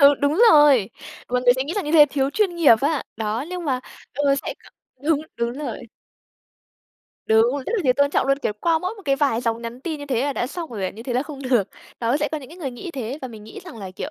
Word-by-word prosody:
Ừ, 280 0 +8
đúng 295 +9 +2
rồi, 290 -9 +6 0.4
mọi 250 0 0
người 245 -1 +6
sẽ 260 - -1
nghĩ 320 - -4
rằng 405 - -2
như 300 - -3
thế 300 -3 +8
thiếu 270 -1 0
chuyên 385 +2 +1
nghiệp 320 -8 +7
á. 290 0 0
Đó, 220 +3 -2
nhưng 360 -2 -5
mà, 260 -3 0 0.3
ừ, 280 +1 +2
sẽ - - -3
gọi - - -18 0.4
đúng, 300 -3 +3 0.2
đúng 235 0 -1
rồi. 290 +3 -5 1.5
Đúng, 225 +4 +4
rất - - -2
là - - 0
thiếu 255 - +5
tôn 285 0 +3
trọng 270 - +1
luôn, 275 0 +2
kiểu, 250 - -1
qua 330 -1 +2
mỗi 365 +5 -4
một 410 - -13
cái 275 -1 +2
vài 275 -6 +1
dòng 230 -1 -2
nhắn 235 +2 -7
tin 310 +1 -4
như 285 - -8
thế 255 -2 0
là 285 - 0
đã 245 - -2
xong 325 +1 -6
rồi 205 -5 -4
à? - - -1
Như 225 - -10
thế 245 0 -4
là 250 - +2
không 285 -2 -9
được. 245 -7 +1 0.3
Đó, 235 0 +1
thì 285 - +2
sẽ - - +1
có 310 - -1
những 265 -3 -12
cái 335 - -13
người 275 -7 -4
nghĩ 245 +8 -8
thế 265 -2 -5
và 260 - -4
mình 220 -3 -11
nghĩ 220 - -10
rằng 340 -11 -10
là, 195 -3 -7
kiểu, 185 - -6
275 Hz, 280 wpm, -22 LUFS, 240-300 Hz, 1.5 s, Ừ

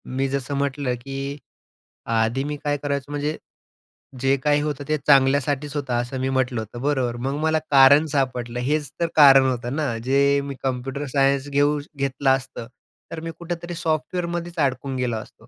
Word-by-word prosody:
मी 135 +1 +1
जसं 140 +1 -3
म्हटलं, 140 -2 -1
की 135 +2 -5 0.7
आधी 115 +3 0
मी 150 +1 -3
काय 145 0 0
करायचो 140 0 -3
म्हणजे 145 +2 -2 0.8
जे 135 +1 +3
काही 145 0 +3
होतं 145 -1 -3
ते 155 - +1
चांगल्यासाठीच 140 +1 +3
होतं, 140 -4 -2
असं 125 +2 -5
मी 130 - 0
म्हटलं 130 -2 0
होतं, 110 +3 -8
बरोबर? 130 -4 0
मग 135 +3 -2
मला 160 0 +2
कारण 140 +2 +7
सापडलं. 125 -3 -1
हेच 145 +3 -1
तर 170 - +2
कारण 135 -3 +8
होतं 125 +1 -3
ना. 140 -7 -1
जे 140 +1 +3
मी 140 -1 -5
कम्प्युटर 135 +2 -3
सायन्स 140 0 +2
घेऊ 145 +1 +2 0.2
घेतलं 140 0 0
असतं, 130 -3 -2 0.4
तर 165 - -5
मी 165 0 -5
कुठेतरी 175 0 -5
सॉफ्टवेअरमध्येच 170 +1 -2
अडकून 130 0 -3
गेलो 125 -3 -1
असतो. 110 - -12
140 Hz, 165 wpm, -23 LUFS, 130-145 Hz, 0.8 s, कारण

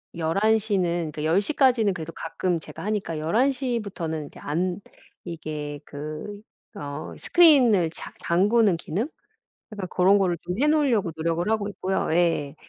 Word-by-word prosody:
11 195 +7 +2
시는 175 -7 -1
그러니까 150 0 -5
10 165 +5 +3
시까지는 240 -5 +2
그래도 165 -1 -7
가끔 170 0 -2
제가 - - -10
하니까 195 -7 -2
11 225 - +2
시부터는 200 - -3
이제 - - -14
안 175 +5 -2 0.5
이게 150 -3 -5
그 155 +8 -7 0.3
어 145 -5 -6
스크린을 255 - +5
자 160 - -9
잠그는 200 +2 +3
기능? 195 - -3 0.6
약간 200 -3 -5
고런 190 +3 +4
거를 180 -3 +1
좀 180 - -4
해 295 - +4
놓으려고 265 - +2
노력을 165 +4 -1
하고 215 -2 0
있고요. 190 -1 -2
예. 165 -4 +1
185 Hz, 295 characters per minute, -25 LUFS, 160-215 Hz, 0.6 s, 스크린을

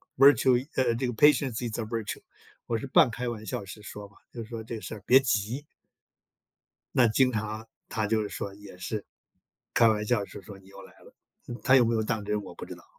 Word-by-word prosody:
Virtue 130 -1 +5
“呃， 125 -3 +2
这 130 +3 -1
个” - - -1
Patience 145 -3 +4
is 110 - -5
a - - -1
virtue， 110 -1 -4 0.5
“我 115 - 0
是 110 - -5
半 125 - +5
开 125 +2 -4
玩 115 -2 -4
笑 100 0 -4
式 100 +2 -10
说 105 -1 -9
嘛， 100 - -24 0.2
就 120 - -6
说： 115 0 -7
“这 115 +1 -6
个 110 - -7
事 - - -7
儿 105 - -11
别 130 - +8
急。” 125 +2 -1 1.3
那 120 -2 +5
经 125 +4 +3
常 110 0 -4 0.2
她 110 -2 -1
就 110 +1 +1
是 105 - -4
说 100 0 -5
也 100 -2 -13
是， 100 +3 -4 0.7
开 115 - +6
玩 105 -1 +1
笑 105 -4 +1
式 - - -10
说： 100 -1 -11
“你 95 - -20
又 - - -12
来 - - -15
了。” - - -18 0.5
她 130 - +6
有 125 - +6
没 115 - +1
有 110 - +1
当 110 -2 -2
真 105 0 -1
我 - - -10
不 - - -8
知 - - -8
道。 - - -17
110 Hz, 330 characters per minute, -28 LUFS, 105-125 Hz, 1.3 s, 别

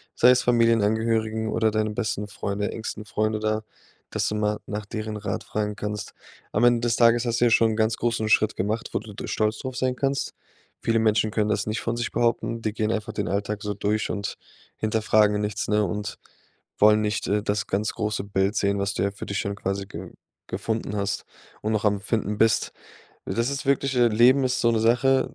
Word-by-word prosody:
sei 125 - +6
es 125 - +4
Familienangehörigen 110 -1 +2
oder 110 +1 +2
deinen 110 0 0
besten 105 -3 -2
Freunde, 100 0 -3
engsten 110 -1 -6
Freunde 110 +1 -1
da, 110 0 -1 0.5
dass - - 0
du 105 - -2
mal 105 0 0
nach 105 0 -5
deren 110 0 -4
Rat 105 - -3
fragen 105 -1 -2
kannst. 105 0 -5 0.4
Am 105 - +1
Ende 120 -1 +5
des 115 - +2
Tages 120 0 +4
hast 120 -1 0
du 120 - +6
ja 120 - +3
schon 115 0 +4
'n - - -2
ganz 110 0 +1
großen 115 -2 0
Schritt 110 0 +3
gemacht, 105 +4 -2
wo - - +1
du 110 -1 -11
d 100 - -7
stolz 110 0 0
drauf 130 -1 -5
sein 130 -1 0
kannst. 140 +1 -1 0.5
Viele 115 0 +2
Menschen 110 -1 +2
können 105 -1 0
das 100 -1 0
nicht 110 +2 -1
von 115 0 -2
sich 120 - -2
behaupten. 115 0 0
Die 110 - -1
gehen 110 0 0
einfach 110 -1 -3
den 105 - -2
Alltag 105 +1 -2
so 105 -1 -2
durch 105 +2 -1
und 100 -1 -3 0.4
hinterfragen 110 -1 +2
nichts, 105 -1 -2
ne, 105 0 +2
und 105 +4 -4 0.6
wollen 105 +1 +6
nicht, 105 +1 -1
äh, 105 0 +1
das 100 -2 -1
ganz 105 +2 -1
große 105 -2 -2
Bild 100 +1 0
sehen, 100 -1 +1
was 100 0 -1
du 100 0 0
für 100 - -8
dich 100 - -2
schon 100 0 -2
quasi 100 0 -3
ge 90 -1 -8 0.4
gefunden 105 +2 -3
hast 100 0 -2 0.4
und 110 - -1
noch 105 0 0
am 100 -1 +2
Finden 105 -1 -1
bist. 115 +1 +2 0.5
Das 115 +3 0
ist 140 0 -4
wirklich, 140 -1 +1
äh 120 - +5
Leben 125 +5 +5
ist 130 0 0
so 115 - +3
'ne 115 - +2
Sache, 125 +4 +3
110 Hz, 210 wpm, -25 LUFS, 105-115 Hz, 0.6 s, sei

